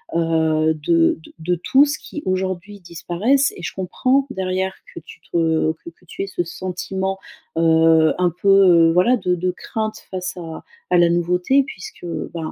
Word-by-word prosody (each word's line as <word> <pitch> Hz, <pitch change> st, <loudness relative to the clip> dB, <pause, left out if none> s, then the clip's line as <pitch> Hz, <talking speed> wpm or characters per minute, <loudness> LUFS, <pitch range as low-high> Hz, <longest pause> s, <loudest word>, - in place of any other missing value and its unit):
heu, 160 Hz, -1 st, +2 dB
de 165 Hz, +2 st, +2 dB
de -, -, -16 dB
de 175 Hz, +2 st, -1 dB
tous, 285 Hz, +2 st, +3 dB
qui 300 Hz, -, -8 dB
aujourd'hui 185 Hz, +2 st, -3 dB
disparaissent 190 Hz, -, 0 dB
et 175 Hz, -, -10 dB
je 150 Hz, -, -4 dB
comprends 255 Hz, +9 st, 0 dB
derrière 190 Hz, -2 st, -2 dB, 0.2 s
que -, -, -7 dB
tu 445 Hz, -1 st, -14 dB
te 160 Hz, -1 st, +1 dB
que 160 Hz, +1 st, -11 dB
que 170 Hz, +2 st, -24 dB
tu -, -, -7 dB
aies -, -, -5 dB
ce 175 Hz, -2 st, -2 dB
sentiment, 190 Hz, +2 st, -4 dB, 0.4 s
heu, 160 Hz, -1 st, +4 dB
un 180 Hz, -1 st, +2 dB
peu 185 Hz, -4 st, +5 dB
voilà 210 Hz, +9 st, +3 dB
de 180 Hz, -4 st, 0 dB
de 180 Hz, +1 st, -1 dB
crainte 215 Hz, +3 st, -4 dB
face 185 Hz, -1 st, -4 dB
à 165 Hz, -2 st, -8 dB, 0.3 s
à 180 Hz, -, +5 dB
la 170 Hz, -1 st, +5 dB
nouveauté, 180 Hz, +10 st, +2 dB
puisque, 185 Hz, -8 st, -10 dB, 0.3 s
ben, 165 Hz, -2 st, -5 dB
180 Hz, 170 wpm, -20 LUFS, 165-195 Hz, 0.4 s, peu